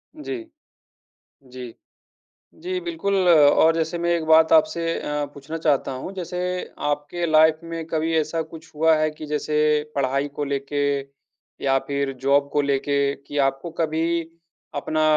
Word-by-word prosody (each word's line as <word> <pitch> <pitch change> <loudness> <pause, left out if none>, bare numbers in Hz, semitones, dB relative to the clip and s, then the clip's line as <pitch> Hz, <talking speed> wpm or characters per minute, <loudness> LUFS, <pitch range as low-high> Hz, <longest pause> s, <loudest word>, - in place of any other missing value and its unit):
जी, 310 +5 -5 1.1
जी। 125 -2 -9 0.9
जी, 370 +1 -2
बिल्कुल, 325 - -2
और 160 0 +6
जैसे 165 +1 -1
मैं 170 0 0
एक 170 -2 +1
बात 160 0 +5
आपसे 165 +1 +4 0.2
अ, 150 0 -2
पूछना 140 +3 -7
चाहता 145 -4 +1
हूँ। 130 +9 -6
जैसे 180 -1 -5 0.5
आपके 145 +4 -2
लाइफ़ 155 0 +5
में 165 -1 -5
कभी 165 0 -1
ऐसा 155 +1 -1
कुछ 160 +1 -13
हुआ 160 +1 +4
है 155 0 +1
कि 155 0 -9
जैसे 150 0 -1 0.4
पढ़ाई 140 +1 0
को 145 - 0
लेके 140 +1 -2 0.8
या 135 -1 +3
फिर 140 -1 -1
जॉब 140 +1 +3
को 145 - +2
लेके, 140 0 +1
कि 145 +1 -7
आपको 135 +4 0
कभी 165 +1 0 0.5
अपना 155 +2 -1
155 Hz, 145 wpm, -23 LUFS, 140-165 Hz, 1.1 s, और